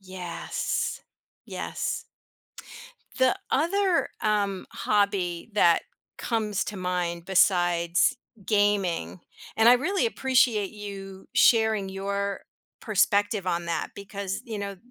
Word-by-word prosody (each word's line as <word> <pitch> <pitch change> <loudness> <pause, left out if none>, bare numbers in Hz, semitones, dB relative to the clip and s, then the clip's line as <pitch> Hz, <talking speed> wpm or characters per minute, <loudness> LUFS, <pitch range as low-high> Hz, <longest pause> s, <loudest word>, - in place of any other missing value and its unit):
Yes, 185 -3 -3 0.4
yes. - - -4 1.1
The 260 -1 +4 0.2
other, 365 +4 +2
um, 200 -3 0
hobby 200 -4 0
that 170 -5 +4 0.4
comes 215 -4 -1
to 210 - -6
mind 180 -2 -2
besides 175 +2 +3 0.3
gaming, 205 -4 +1 0.4
and 225 +1 +5
I - - +9
really 380 - 0
appreciate 250 - +2
you 195 -2 -9
sharing 220 -4 +4
your 200 +1 -3 0.4
perspective 205 -1 +1
on 170 -1 -1
that 165 -2 -2
because, 200 -1 -5
you 220 -3 -5
know, 200 -1 -5
200 Hz, 100 wpm, -26 LUFS, 185-220 Hz, 1.1 s, I